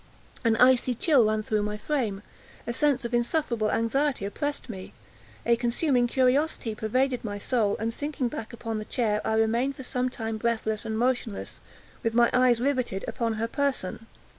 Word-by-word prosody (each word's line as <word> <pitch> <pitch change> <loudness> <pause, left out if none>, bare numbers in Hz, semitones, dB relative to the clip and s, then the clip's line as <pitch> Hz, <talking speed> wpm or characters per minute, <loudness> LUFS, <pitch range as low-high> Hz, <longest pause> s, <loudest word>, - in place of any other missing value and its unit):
An 230 -2 +3
icy 250 +1 +4
chill 260 -3 +4
ran 215 0 0
through 215 -1 0
my 210 0 -2
frame; 215 -5 -2 0.4
a 235 - -2
sense 275 -1 +1
of 235 - -4
insufferable 240 -3 +1
anxiety 245 +1 0
oppressed 290 +9 -3
me; 190 -5 -8 0.5
a 235 - +4
consuming 245 +2 +1
curiosity 260 -1 +1
pervaded 250 +4 0
my 205 -2 -4
soul; 210 -1 0
and 225 +1 -2
sinking 285 -1 -2
back 225 -2 -6
upon 225 -2 -4
the 215 - -6
chair, 215 -4 0
I 220 - 0
remained 230 +5 +1
for 265 - -8
some 250 0 -1
time 225 -3 -4
breathless 220 -1 -1
and 220 -1 -2
motionless, 240 -3 -1 0.4
with 230 0 -1
my 235 0 +5
eyes 250 -2 +4
riveted 255 -7 -1
upon 230 -3 -1
her 220 +1 -1
person. 235 -5 -2
235 Hz, 170 wpm, -27 LUFS, 220-255 Hz, 0.5 s, my